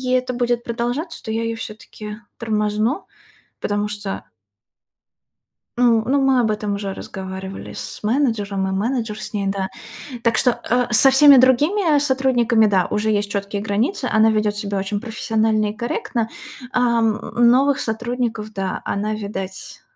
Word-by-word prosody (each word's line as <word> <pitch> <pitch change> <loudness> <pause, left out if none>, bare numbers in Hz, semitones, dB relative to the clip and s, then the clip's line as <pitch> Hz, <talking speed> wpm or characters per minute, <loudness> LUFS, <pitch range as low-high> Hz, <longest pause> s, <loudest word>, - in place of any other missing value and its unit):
это 255 0 0
будет 240 -1 0
продолжаться, 240 +7 -3
то 220 - -5
я 225 +1 -1
её 230 0 -2
всё-таки 215 -1 -8 0.2
тормозну, 215 - -1 0.6
потому 205 0 -1
что 205 -1 -5 1.5
Ну 235 -2 +4
ну, 275 +2 +2
мы 270 -1 +3
об 225 -3 +2
этом 210 -1 -2
уже 200 -1 -4
разговаривали 190 0 -7
с - - -7
менеджером, 210 -5 0
и - - -2
менеджер 220 +2 -2
с - - -7
ней, 200 -2 -1
да. 195 -1 -2 0.5
Так 230 - +2
что, 250 - +3
а, 245 0 0
со 265 +5 +8
всеми 280 0 +8
другими, 300 +8 +4
а, 290 - +4
сотрудниками, 260 -5 +2
да, 190 -4 +2
уже 215 +1 0
есть 205 -1 0
чёткие 200 0 -3
границы, 225 - -1
она 220 0 +5
ведёт 210 -1 0
себя 200 -1 -2
очень 200 +1 -2
профессионально 220 -1 0
и - - -5
корректно. 230 0 -2 0.4
Ам, 235 -3 +2
э, - - -8
новых 260 +4 +4
сотрудников, 225 -1 -3
да, 195 -2 -3
она, 210 +2 -2
видать, 195 -3 -6
220 Hz, 155 wpm, -21 LUFS, 205-245 Hz, 1.5 s, со